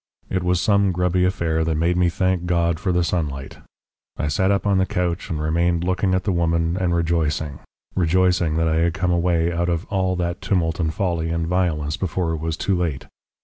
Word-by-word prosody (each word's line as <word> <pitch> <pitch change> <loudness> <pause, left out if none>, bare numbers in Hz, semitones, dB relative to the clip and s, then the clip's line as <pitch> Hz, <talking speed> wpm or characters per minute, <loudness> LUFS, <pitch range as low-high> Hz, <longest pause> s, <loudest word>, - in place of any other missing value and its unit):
It 95 - 0
was 90 0 +1
some 100 0 +3
grubby 90 0 +1
affair 80 -3 0
that 80 -1 0
made 85 +3 +1
me 90 -1 +3
thank 90 0 0
God 85 -1 +1
for 95 -2 -1
the 90 0 +2
sunlight. 75 -6 -3 0.6
I 75 - -1
sat 95 +6 +1
up 100 0 +1
on 100 -2 +3
the 95 - +1
couch 90 +1 -2
and 80 -4 -2
remained 85 +2 +1
looking 95 +1 +1
at 95 - 0
the 100 - 0
woman 85 -1 +1
and 90 -2 0
rejoicing 80 -4 -1 0.4
rejoicing 90 -2 +2
that 80 0 +2
I 80 0 +1
had 85 0 +1
come 90 -2 0
away 85 -1 +1
out 85 +1 0
of 85 +1 -1
all 95 -2 +1
that 85 0 -3
tumult 85 -4 0
and 80 -2 0
folly 85 -3 -1
and 85 0 -1
violence 85 -3 0
before 90 -2 -1
it 80 - -2
was 80 0 -3
too 100 - 0
late. 85 -6 -2
85 Hz, 210 wpm, -22 LUFS, 80-90 Hz, 0.6 s, some